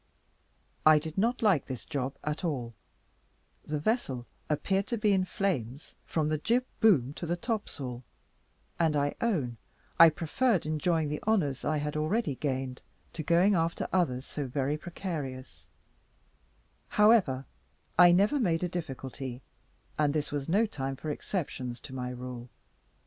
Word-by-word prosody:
I 155 Hz, 0 st, +8 dB
did 155 Hz, +1 st, -4 dB
not 230 Hz, +5 st, +1 dB
like 195 Hz, -10 st, +3 dB
this 130 Hz, -3 st, -6 dB
job 140 Hz, -2 st, -3 dB
at 150 Hz, +3 st, -3 dB
all; 130 Hz, -8 st, -2 dB, 0.9 s
the 150 Hz, -, -3 dB
vessel 145 Hz, -, -1 dB, 0.2 s
appeared 195 Hz, +6 st, 0 dB
to 235 Hz, -, -1 dB
be 210 Hz, -1 st, +2 dB
in 185 Hz, -1 st, +2 dB
flames 145 Hz, -, -2 dB
from 155 Hz, -2 st, 0 dB
the 155 Hz, 0 st, 0 dB
jib 240 Hz, +9 st, +1 dB
boom 145 Hz, -, +4 dB
to 170 Hz, -, -6 dB
the 170 Hz, -, +1 dB
topsail; 145 Hz, -, -4 dB, 0.8 s
and 160 Hz, -3 st, +3 dB
I 145 Hz, 0 st, +1 dB
own 150 Hz, -, 0 dB, 0.4 s
I 165 Hz, 0 st, +11 dB
preferred 170 Hz, +6 st, 0 dB
enjoying 155 Hz, 0 st, +1 dB
the 150 Hz, -, -3 dB
honours 150 Hz, -, +1 dB
I 155 Hz, -, +1 dB
had 150 Hz, 0 st, -3 dB
already 155 Hz, +3 st, 0 dB
gained, 130 Hz, -2 st, -3 dB, 0.3 s
to 165 Hz, -, -4 dB
going 170 Hz, +6 st, +4 dB
after 165 Hz, -2 st, 0 dB
others 140 Hz, -8 st, +1 dB
so 145 Hz, -2 st, -4 dB
very 140 Hz, +3 st, -1 dB
precarious; 140 Hz, -, -6 dB, 1.2 s
however, 210 Hz, -, +4 dB, 0.5 s
I 175 Hz, +1 st, +8 dB
never 200 Hz, +11 st, +4 dB
made 175 Hz, -8 st, +1 dB
a -, -, +1 dB
difficulty, 135 Hz, -6 st, -5 dB, 0.6 s
and 150 Hz, -1 st, +2 dB
this 150 Hz, -1 st, -1 dB
was 145 Hz, 0 st, -3 dB
no 205 Hz, +6 st, +4 dB
time 135 Hz, -9 st, -4 dB
for 150 Hz, +3 st, -4 dB
exceptions 130 Hz, -, -4 dB
to 130 Hz, -, -10 dB
my 125 Hz, -1 st, -3 dB
rule. 125 Hz, -1 st, -7 dB
155 Hz, 150 wpm, -30 LUFS, 135-185 Hz, 1.2 s, I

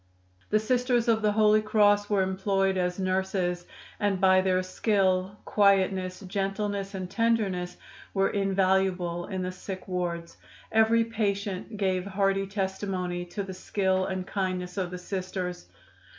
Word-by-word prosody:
The 215 Hz, -, +4 dB
Sisters 245 Hz, +2 st, +1 dB
of 225 Hz, -1 st, +3 dB
the 210 Hz, -1 st, +2 dB
Holy 215 Hz, 0 st, +5 dB
Cross 205 Hz, -1 st, +3 dB
were 200 Hz, -2 st, +3 dB
employed 195 Hz, 0 st, +1 dB
as 180 Hz, -1 st, 0 dB
nurses, 185 Hz, -2 st, -1 dB, 0.3 s
and 205 Hz, -3 st, +1 dB
by 185 Hz, 0 st, +5 dB
their 185 Hz, -1 st, +1 dB
skill, 190 Hz, 0 st, +1 dB
quietness, 190 Hz, -2 st, +2 dB
gentleness 195 Hz, +1 st, -2 dB
and 185 Hz, -1 st, -4 dB
tenderness 195 Hz, -4 st, 0 dB, 0.3 s
were 195 Hz, -1 st, +1 dB
invaluable 190 Hz, -3 st, +1 dB
in 190 Hz, -2 st, -3 dB
the 185 Hz, -, -2 dB
sick 185 Hz, 0 st, -7 dB
wards. 175 Hz, -2 st, -3 dB, 0.3 s
Every 220 Hz, +1 st, +4 dB
patient 205 Hz, -2 st, -2 dB
gave 190 Hz, -2 st, 0 dB
hearty 195 Hz, 0 st, 0 dB
testimony 190 Hz, -2 st, -3 dB
to 200 Hz, +3 st, -5 dB
the 190 Hz, -1 st, -7 dB
skill 190 Hz, 0 st, 0 dB
and 185 Hz, -1 st, -3 dB
kindness 185 Hz, -2 st, -3 dB
of 185 Hz, -3 st, -2 dB
the 180 Hz, -, -6 dB
Sisters. 180 Hz, -, -4 dB
190 Hz, 135 wpm, -27 LUFS, 185-205 Hz, 0.3 s, Holy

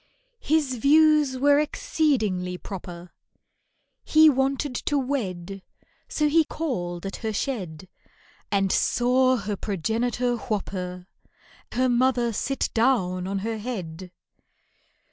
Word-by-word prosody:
His 290 Hz, -4 st, 0 dB
views 300 Hz, +1 st, +4 dB
were 285 Hz, +2 st, +4 dB
exceedingly 215 Hz, -, 0 dB
proper, 180 Hz, -2 st, -9 dB, 0.9 s
He 310 Hz, 0 st, +6 dB
wanted 270 Hz, +1 st, 0 dB
to 290 Hz, +4 st, -1 dB
wed, 195 Hz, -9 st, -3 dB, 0.5 s
So 300 Hz, -, 0 dB
he 320 Hz, +2 st, +4 dB
called 180 Hz, -, -4 dB
at 195 Hz, -, -5 dB
her 220 Hz, -2 st, -3 dB
shed 190 Hz, -, -4 dB, 0.6 s
And 195 Hz, -2 st, +1 dB
saw 255 Hz, +1 st, +3 dB
her 205 Hz, -2 st, -3 dB
progenitor 230 Hz, +6 st, -1 dB
whop 215 Hz, -4 st, -3 dB
her— 180 Hz, -1 st, -5 dB, 0.7 s
Her 255 Hz, +1 st, +2 dB
mother 245 Hz, -1 st, +2 dB
sit 270 Hz, +6 st, -2 dB
down 190 Hz, -7 st, +1 dB
on 195 Hz, +1 st, -2 dB
her 225 Hz, -1 st, -3 dB
head. 185 Hz, -6 st, -6 dB
235 Hz, 110 wpm, -25 LUFS, 185-270 Hz, 0.9 s, He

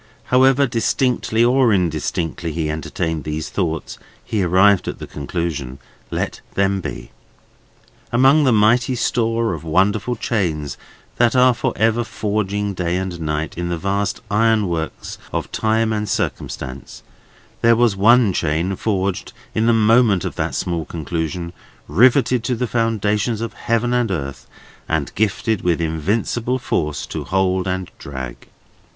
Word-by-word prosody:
However 135 Hz, +2 st, +5 dB
distinctly 120 Hz, -1 st, +1 dB
or 125 Hz, -1 st, +4 dB
indistinctly 85 Hz, -3 st, -1 dB
he 75 Hz, -1 st, -1 dB
entertained 80 Hz, 0 st, -3 dB
these 75 Hz, 0 st, -4 dB
thoughts, 80 Hz, -5 st, -3 dB, 0.3 s
he 105 Hz, -, -1 dB
arrived 95 Hz, +2 st, +4 dB
at -, -, -3 dB
the -, -, -7 dB
conclusion, 70 Hz, -3 st, -4 dB, 0.3 s
Let -, -, -3 dB
them 100 Hz, 0 st, +1 dB
be. -, -, -7 dB, 1.0 s
Among 135 Hz, +5 st, +5 dB
the 130 Hz, -, +4 dB
mighty 115 Hz, +4 st, +3 dB
store 115 Hz, -2 st, 0 dB
of 80 Hz, -2 st, -6 dB
wonderful 100 Hz, +8 st, +1 dB
chains 80 Hz, -, -2 dB, 0.4 s
that 120 Hz, +1 st, +3 dB
are 125 Hz, 0 st, +6 dB
for 120 Hz, +1 st, -1 dB
ever 115 Hz, +2 st, +2 dB
forging, 105 Hz, -2 st, -2 dB
day 90 Hz, -1 st, -1 dB
and 90 Hz, -2 st, -4 dB
night, 75 Hz, +1 st, -3 dB
in 85 Hz, 0 st, -2 dB
the 85 Hz, -, -1 dB
vast 100 Hz, +2 st, -1 dB
iron 110 Hz, -1 st, +3 dB
works 80 Hz, -2 st, -4 dB
of -, -, -3 dB
time 110 Hz, 0 st, +1 dB
and 105 Hz, -1 st, -2 dB
circumstance, 65 Hz, -6 st, -4 dB, 0.6 s
there 115 Hz, 0 st, +5 dB
was 115 Hz, -3 st, +3 dB
one 110 Hz, +1 st, +5 dB
chain 85 Hz, +5 st, 0 dB
forged 95 Hz, -2 st, -2 dB, 0.2 s
in 110 Hz, +1 st, +1 dB
the -, -, +5 dB
moment 110 Hz, -3 st, +4 dB
of -, -, -3 dB
that -, -, -2 dB
small 85 Hz, -2 st, -2 dB
conclusion, 85 Hz, +2 st, -4 dB, 0.3 s
riveted 125 Hz, -, +4 dB
to 125 Hz, -, 0 dB
the 125 Hz, +2 st, -1 dB
foundations 110 Hz, -2 st, 0 dB
of 115 Hz, 0 st, -4 dB
heaven 115 Hz, +1 st, 0 dB
and 120 Hz, -2 st, +1 dB
earth, 70 Hz, -8 st, -4 dB, 0.4 s
and 80 Hz, -4 st, -1 dB
gifted 110 Hz, 0 st, 0 dB
with 85 Hz, -2 st, +1 dB
invincible 105 Hz, -, -1 dB
force 75 Hz, -, -2 dB
to -, -, -5 dB
hold 95 Hz, -1 st, 0 dB
and 95 Hz, -1 st, -3 dB
drag. 65 Hz, -3 st, -7 dB
100 Hz, 145 wpm, -20 LUFS, 85-115 Hz, 1.0 s, are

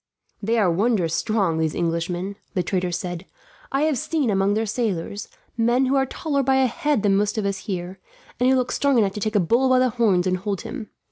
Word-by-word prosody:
"They 225 Hz, +3 st, 0 dB
are 200 Hz, -6 st, +3 dB
wondrous 190 Hz, -3 st, +1 dB
strong, 195 Hz, -3 st, 0 dB
these 160 Hz, -1 st, 0 dB
Englishmen," 175 Hz, +3 st, -2 dB, 0.2 s
the 180 Hz, -, +1 dB
trader 180 Hz, -1 st, -1 dB
said. 175 Hz, 0 st, -4 dB, 0.5 s
"I 275 Hz, +2 st, +1 dB
have 305 Hz, -5 st, +1 dB
seen, 290 Hz, -6 st, 0 dB
among 195 Hz, +1 st, +2 dB
their 220 Hz, +1 st, 0 dB
sailors, 210 Hz, -3 st, -3 dB, 0.3 s
men 240 Hz, +3 st, +2 dB
who 265 Hz, +2 st, +1 dB
are 270 Hz, -1 st, +2 dB
taller 280 Hz, +1 st, -1 dB
by 265 Hz, 0 st, +2 dB
a 265 Hz, 0 st, +4 dB
head 260 Hz, 0 st, 0 dB
than 200 Hz, -2 st, +3 dB
most 205 Hz, +2 st, 0 dB
of 215 Hz, -, -1 dB
us 195 Hz, -1 st, -1 dB
here, 185 Hz, 0 st, -4 dB, 0.4 s
and 250 Hz, +1 st, +3 dB
who 265 Hz, -, +4 dB
look 250 Hz, -1 st, 0 dB
strong 280 Hz, -2 st, +2 dB
enough 200 Hz, -4 st, +2 dB
to 210 Hz, -, -5 dB
take 215 Hz, +1 st, -2 dB
a -, -, +5 dB
bull 235 Hz, +9 st, +2 dB
by 255 Hz, -, +5 dB
the 255 Hz, 0 st, +3 dB
horns 210 Hz, -7 st, +2 dB
and 185 Hz, 0 st, +1 dB
hold 195 Hz, 0 st, -3 dB
him. 230 Hz, -5 st, -7 dB
210 Hz, 225 wpm, -23 LUFS, 185-250 Hz, 0.5 s, a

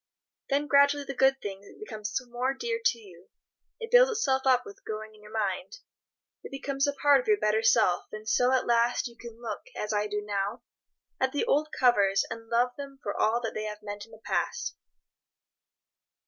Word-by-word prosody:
Then 285 Hz, +1 st, +1 dB
gradually 285 Hz, 0 st, +4 dB
the 275 Hz, -, -5 dB
good 270 Hz, +1 st, +3 dB
thing 200 Hz, 0 st, -8 dB
becomes 215 Hz, -, -4 dB
more 250 Hz, +3 st, -1 dB
dear 465 Hz, +6 st, -3 dB
to 240 Hz, -, +3 dB
you; 185 Hz, -5 st, -16 dB, 0.5 s
it 455 Hz, -1 st, -6 dB
builds -, -, +7 dB
itself 270 Hz, -, 0 dB
up 255 Hz, -1 st, +4 dB
with 405 Hz, -1 st, -11 dB
your 215 Hz, -, -2 dB
growing 215 Hz, 0 st, -11 dB
mind; 220 Hz, -, -2 dB, 0.6 s
it -, -, -9 dB
becomes 275 Hz, 0 st, -1 dB
a 285 Hz, -, 0 dB
part 285 Hz, -, +4 dB
of -, -, -14 dB
your 425 Hz, -1 st, +4 dB
better 215 Hz, -, +1 dB
self, 220 Hz, -5 st, +3 dB
and 215 Hz, 0 st, -8 dB
so, 245 Hz, +4 st, +3 dB
at 260 Hz, -1 st, +2 dB
last, 235 Hz, +1 st, +2 dB
you 235 Hz, -, -13 dB
can 230 Hz, 0 st, -11 dB
look, 235 Hz, -2 st, -5 dB, 0.2 s
as 210 Hz, +1 st, -2 dB
I 210 Hz, 0 st, +1 dB
do 210 Hz, 0 st, -3 dB
now, 205 Hz, +3 st, -2 dB, 0.6 s
at 260 Hz, 0 st, +1 dB
the 290 Hz, -, 0 dB
old 300 Hz, +2 st, +2 dB
covers 200 Hz, -6 st, +3 dB
and 225 Hz, 0 st, -7 dB
love 240 Hz, +1 st, +2 dB
them 280 Hz, -1 st, -8 dB
for 205 Hz, -, -3 dB
all 230 Hz, +3 st, +2 dB
that 225 Hz, -, -3 dB
they 215 Hz, -, -4 dB
have 210 Hz, 0 st, -6 dB
meant 205 Hz, 0 st, -6 dB
in -, -, -22 dB
the 220 Hz, -, -12 dB
past. -, -, -2 dB
240 Hz, 195 wpm, -28 LUFS, 215-275 Hz, 0.6 s, builds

